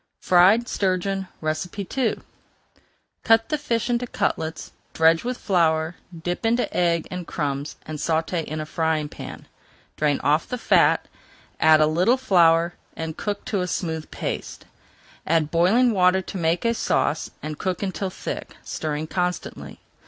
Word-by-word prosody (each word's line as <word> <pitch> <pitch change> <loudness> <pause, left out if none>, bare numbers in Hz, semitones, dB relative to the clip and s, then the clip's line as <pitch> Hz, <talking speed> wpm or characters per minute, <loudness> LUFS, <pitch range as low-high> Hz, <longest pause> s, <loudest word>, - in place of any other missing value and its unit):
FRIED 190 +7 +5
STURGEON 195 -1 -1 0.2
II 185 +10 -2 1.1
Cut 225 0 +4
the 305 - +1
fish 235 -6 -1
into 245 0 0
cutlets, 160 -7 -2 0.2
dredge 165 0 +4
with 250 +1 -3
flour, 160 -3 +1 0.3
dip 175 +5 -3
into 235 +2 +1
egg 170 -2 +1
and 180 -2 -5
crumbs, 145 -1 -3
and 155 -1 -6
sauté 165 +2 0
in 155 +1 -5
a 155 - -3
frying 160 -1 0
pan. - - -9 0.5
Drain 150 -2 +1
off 150 +3 +2
the 250 - -2
fat, - - +3 0.5
add 155 -1 +6
a - - +6
little 180 +11 +3
flour 170 -8 +4 0.2
and 160 -1 -5
cook 205 +2 -4
to 200 -3 -1
a 180 - -1
smooth 160 -3 -3
paste. - - -5 0.6
Add 155 -1 +2
boiling 200 +9 +4
water 190 -2 +3
to 195 - -6
make 170 +4 0
a 230 - +3
sauce, 160 -7 0
and 155 0 -5
cook 185 +1 -2
until 195 0 -2
thick, 185 - -6
stirring 155 0 -3
constantly. 180 +1 -4
175 Hz, 145 wpm, -24 LUFS, 160-200 Hz, 1.1 s, add